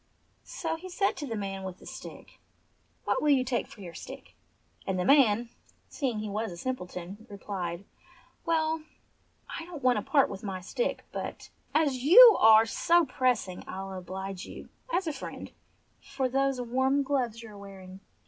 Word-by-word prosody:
So - - -3
he 370 +3 -9
said 390 +2 +1
to 295 - -5
the 230 - -3
man 195 -2 -4
with 185 -1 -6
the - - -16
stick, - - -10 0.6
"What - - 0
will 300 - +2
you 270 -3 +5
take 250 -1 -1
for 210 - -14
your 175 -3 -8
stick - - -10 0.3
?" - - -30
and 190 -1 0
the 180 - 0
man, 240 -4 +4 0.4
seeing 260 -7 -2
he 215 0 -3
was 210 +1 -3
a 170 - -8
sim 255 +8 -2
pleton, 180 +2 -9
replied: 195 -3 -5 0.6
"Well, 320 -1 +1 0.7
I - - -6
don't 330 -6 -9
want 250 -3 +4
to - - 0
part 275 +5 +3
with 195 0 -7
my 195 -3 -4
stick, 485 - -3
but - - -6 0.2
as 300 -4 +3
you 420 - +9
are 220 0 +8
so 340 +8 +3
pressing 245 -10 0
I'll 195 0 -6
oblige 190 +1 -6
you, - - -10 0.2
as 375 -5 +1
a 315 - -2
friend, 270 - -8 0.5
for 270 -1 -2
those 270 0 +1
warm 260 +3 +1
gloves 250 -5 -1
you 220 - -10
are 205 - -12
wearing." 190 -1 -11
235 Hz, 180 wpm, -29 LUFS, 195-280 Hz, 0.7 s, you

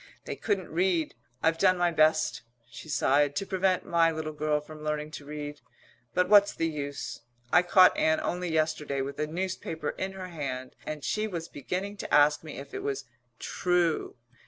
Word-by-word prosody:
They - - -4
couldn't 200 -5 -2
read. 170 -1 +1 0.3
I've 165 0 +2
done 185 -1 +4
my 175 -1 +2
best," 155 0 +3 0.3
she 155 - -10
sighed, 145 0 +2
"to 195 - -1
prevent 190 -1 +1
my 170 -1 +3
little 155 -1 -4
girl 150 0 0
from 155 +1 -11
learning 150 0 -2
to 145 - -8
read, 150 0 -6 0.5
but 180 0 +3
what's 205 0 +6
the 165 - 0
use? 145 -5 -5 0.3
I 175 - +8
caught 185 +1 +6
Ann 160 0 +2
only 180 -1 -2
yesterday 155 -3 0
with 140 +1 -5
a 150 - 0
newspaper 165 -2 -3
in 190 0 -4
her 185 -1 -7
hand 130 -6 -5
and 155 -2 -5
she 215 0 0
was 170 -5 -5
beginning 185 +8 -4
to - - -6
ask 150 +1 +5
me 155 - -8
if 140 - -9
it - - -4
was 140 -1 -3 0.3
'true.' 175 -3 0
160 Hz, 180 wpm, -28 LUFS, 150-180 Hz, 0.5 s, I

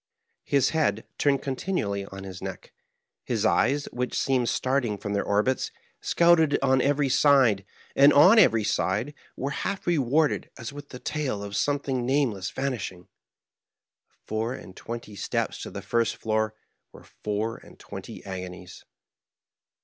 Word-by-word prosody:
His 140 -3 +3
head 160 -1 0
turned 140 -2 +2
continually 130 - -2
on 95 0 -9
his 95 -2 -8
neck; - - -7 0.5
his 115 -3 -1
eyes, 135 +6 +2
which 125 0 -2
seemed 130 -3 +1
starting 130 -5 0
from 100 0 -4
their 100 - 0
orbits, 105 +6 +1 0.3
scouted 170 -3 +4
on 130 -1 +4
every 145 +1 +2
side, 135 -7 +4 0.3
and 140 +1 +7
on 185 +10 +7
every 115 - +5
side 105 +8 0 0.2
were 140 +2 -2
half 195 +7 -3
rewarded 150 -2 +1
as 120 +1 -7
with 145 0 -10
the 125 - -8
tail 130 -7 -3
of 100 0 -6
something 140 -1 0
nameless 120 -8 0
vanishing. 110 -10 -4 1.0
The - - -37
four 110 +3 -2
and 95 - -11
twenty 115 -2 -7
steps - - -2
to - - -6
the - - -7
first 115 -1 +1
floor 110 0 -1 0.4
were - - -14
four 105 +2 -3
and - - -16
twenty - - -9
agonies. 90 -1 -8
125 Hz, 145 wpm, -26 LUFS, 105-140 Hz, 1.0 s, and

